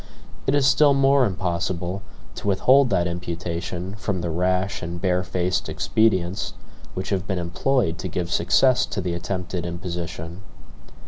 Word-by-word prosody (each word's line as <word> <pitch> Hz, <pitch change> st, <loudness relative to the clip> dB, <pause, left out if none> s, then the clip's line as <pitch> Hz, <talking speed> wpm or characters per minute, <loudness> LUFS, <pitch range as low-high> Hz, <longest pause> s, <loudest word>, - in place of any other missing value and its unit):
It 135 Hz, -, +3 dB
is 140 Hz, -2 st, +3 dB
still 140 Hz, +1 st, +5 dB
more 135 Hz, -1 st, +4 dB
impossible 90 Hz, 0 st, -2 dB, 0.3 s
to -, -, -6 dB
withhold 130 Hz, +7 st, +5 dB
that 85 Hz, -, +2 dB
imputation 85 Hz, +1 st, -4 dB
from 100 Hz, -4 st, -2 dB
the 85 Hz, -1 st, -2 dB
rash 90 Hz, +3 st, 0 dB
and 85 Hz, +1 st, -5 dB
barefaced 90 Hz, 0 st, 0 dB
expedients 95 Hz, -4 st, +1 dB, 0.4 s
which 95 Hz, -, -4 dB
have 95 Hz, -1 st, -1 dB
been 95 Hz, -, -1 dB
employed 85 Hz, +2 st, 0 dB
to -, -, -3 dB
give 90 Hz, -1 st, -3 dB
success 125 Hz, +11 st, +3 dB
to 105 Hz, -, -4 dB
the 90 Hz, -2 st, -2 dB
attempted 90 Hz, 0 st, -3 dB
imposition. 85 Hz, 0 st, -5 dB
90 Hz, 140 wpm, -23 LUFS, 85-100 Hz, 0.4 s, still